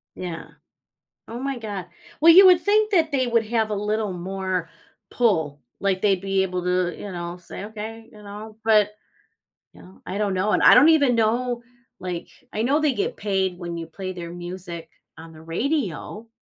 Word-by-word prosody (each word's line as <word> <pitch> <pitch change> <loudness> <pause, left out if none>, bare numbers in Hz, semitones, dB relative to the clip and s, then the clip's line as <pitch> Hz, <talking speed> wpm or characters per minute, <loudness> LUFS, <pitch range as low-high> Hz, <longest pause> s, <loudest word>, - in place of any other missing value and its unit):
Yeah. 175 -3 -6 0.8
Oh 235 +2 -6
my 270 -2 -3
god 205 -5 -6 0.3
well, 330 +2 +8
you 375 +3 +9
would 360 -1 +7
think 425 +1 +2
that 325 -4 +3
they 265 -3 +1
would 230 -1 +2
have 220 -1 0
a 210 - 0
little 210 0 -1
more 185 -1 -3 0.4
pull. 160 - +1 0.2
Like, 195 -2 0
they'd 195 -2 +2
be 195 0 +1
able 180 -1 -2
to, 180 -1 0
you 205 - -7
know, 175 0 -5
say, 180 +2 -9
"Okay." 225 +1 -8
You 210 -2 -15
know? 210 +1 -9
But, 215 -2 +4 0.8
you - - -16
know, 185 - -17
I 190 - -4
don't 205 -2 0
know 190 +3 0
and - - +2
I - - +9
don't 280 +6 +7
even 285 -7 +4
know 235 +2 0 0.4
like 180 -2 -5 0.2
I 215 - -1
know 275 +5 +2
they 300 -3 +2
get 440 +4 -2
paid 190 -3 -1
when 175 -1 -5
you 165 - -5
play 185 +2 -6
their 170 -2 -7
music 175 -1 -8 0.3
on 165 0 -12
the 155 - -13
radio 215 - -3
205 Hz, 190 wpm, -23 LUFS, 180-235 Hz, 0.8 s, you